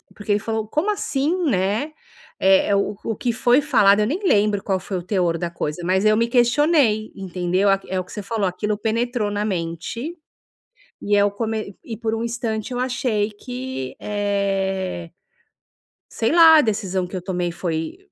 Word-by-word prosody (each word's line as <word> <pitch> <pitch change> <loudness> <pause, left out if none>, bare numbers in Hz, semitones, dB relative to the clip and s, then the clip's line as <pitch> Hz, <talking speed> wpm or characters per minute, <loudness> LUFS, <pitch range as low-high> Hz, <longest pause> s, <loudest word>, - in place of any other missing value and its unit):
porque 205 0 -4
ele 205 - +3
falou: 220 0 -3
"Como 305 - 0
assim, 355 -3 0
né?". 215 +4 0 0.5
Eh, 190 0 +4
é 200 - +3
o 200 +1 0
o 225 - -2
que 240 - -1
foi 245 +3 +3
falado 215 -9 +4
eu 210 - +2
nem 310 +10 -1
lembro 205 - +2
qual 190 -2 0
foi 190 +1 -4
o 175 - -5
teor 180 -3 0
da 175 0 -3
coisa, 160 0 -4
mas 190 +2 +2
eu 215 0 +4
me 230 +1 +2
questionei, 245 -2 +3
entendeu 185 +1 0
a 195 - +4
q 195 - -18
é 190 - 0
o - - -2
que 180 - -16
você 210 - -5
falou, 210 -1 -1
aquilo 210 +4 -2
penetrou 230 0 -1
na 205 0 -1
mente 185 - -4 0.8
e 205 - +1
é 200 - +5
o 205 - +3
come 220 -2 -4
e 225 - -6
por 220 0 -2
um 225 - -3
instante 230 -1 -3
eu 245 - -2
achei 250 -4 0
que, 250 - -6
eh, 195 -3 -2 1.0
sei 225 +3 -1
lá, 325 -1 +8
a - - +7
decisão 200 -6 -1
que 185 - -8
eu 185 - -3
tomei 180 -1 -2
foi 165 - -3
210 Hz, 190 wpm, -22 LUFS, 190-235 Hz, 1.0 s, lá